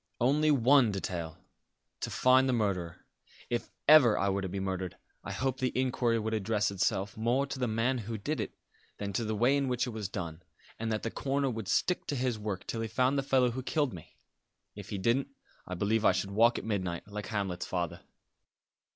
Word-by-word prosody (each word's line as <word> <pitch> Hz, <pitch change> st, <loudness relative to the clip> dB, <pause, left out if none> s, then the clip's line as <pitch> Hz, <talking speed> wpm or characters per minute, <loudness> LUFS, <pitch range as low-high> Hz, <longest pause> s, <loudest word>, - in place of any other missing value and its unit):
"Only 145 Hz, +5 st, +3 dB
one 135 Hz, -3 st, +5 dB
detail. 85 Hz, -4 st, -4 dB, 0.6 s
To -, -, -3 dB
find 130 Hz, +1 st, +4 dB
the -, -, +2 dB
murderer. 95 Hz, -7 st, -2 dB, 0.5 s
If 120 Hz, -, -1 dB, 0.2 s
ever 140 Hz, -7 st, +8 dB
I 100 Hz, -, +1 dB
were 100 Hz, 0 st, 0 dB
to 95 Hz, -, -3 dB
be 100 Hz, +2 st, -3 dB
murdered 95 Hz, -1 st, -3 dB, 0.3 s
I -, -, -5 dB
hope 130 Hz, +1 st, -1 dB
the 130 Hz, -1 st, 0 dB
inquiry 125 Hz, -2 st, +1 dB
would 110 Hz, 0 st, -2 dB
address 105 Hz, -1 st, 0 dB
itself 95 Hz, 0 st, 0 dB
more 120 Hz, +5 st, +1 dB
to 135 Hz, -1 st, -6 dB
the 125 Hz, -, +1 dB
man 115 Hz, +4 st, 0 dB
who 110 Hz, 0 st, -5 dB
did 145 Hz, +9 st, -3 dB
it -, -, -4 dB, 0.4 s
than 100 Hz, -1 st, -4 dB
to 115 Hz, -, 0 dB
the 110 Hz, 0 st, -2 dB
way 120 Hz, +6 st, +3 dB
in 140 Hz, -1 st, +1 dB
which 125 Hz, -1 st, 0 dB
it 125 Hz, -, -4 dB
was 110 Hz, -4 st, -4 dB
done; 85 Hz, -4 st, -5 dB, 0.4 s
and 115 Hz, 0 st, -2 dB
that 110 Hz, -, -1 dB
the 115 Hz, -, -2 dB
coroner 140 Hz, -1 st, 0 dB
would 110 Hz, -4 st, -5 dB
stick 180 Hz, -, +1 dB
to 145 Hz, -, -1 dB
his 125 Hz, -3 st, -1 dB
work 105 Hz, -2 st, -4 dB
till 115 Hz, -, -3 dB
he 115 Hz, -, -2 dB
found 130 Hz, +4 st, +1 dB
the 140 Hz, -, +2 dB
fellow 130 Hz, -2 st, +3 dB
who 130 Hz, +3 st, -4 dB
killed 145 Hz, 0 st, 0 dB
me. 85 Hz, -3 st, -12 dB, 0.6 s
If 100 Hz, -1 st, -10 dB
he 100 Hz, -, -3 dB
didn't, 115 Hz, +8 st, +1 dB, 0.4 s
I 90 Hz, -, -4 dB
believe 105 Hz, +4 st, +1 dB
I 95 Hz, -, +5 dB
should 95 Hz, +1 st, -2 dB
walk 115 Hz, +4 st, +4 dB
at -, -, -5 dB
midnight, 95 Hz, -5 st, -2 dB
like 105 Hz, 0 st, -6 dB
Hamlet's 100 Hz, -5 st, -2 dB
father." 90 Hz, -3 st, -2 dB
110 Hz, 210 wpm, -30 LUFS, 100-130 Hz, 0.6 s, ever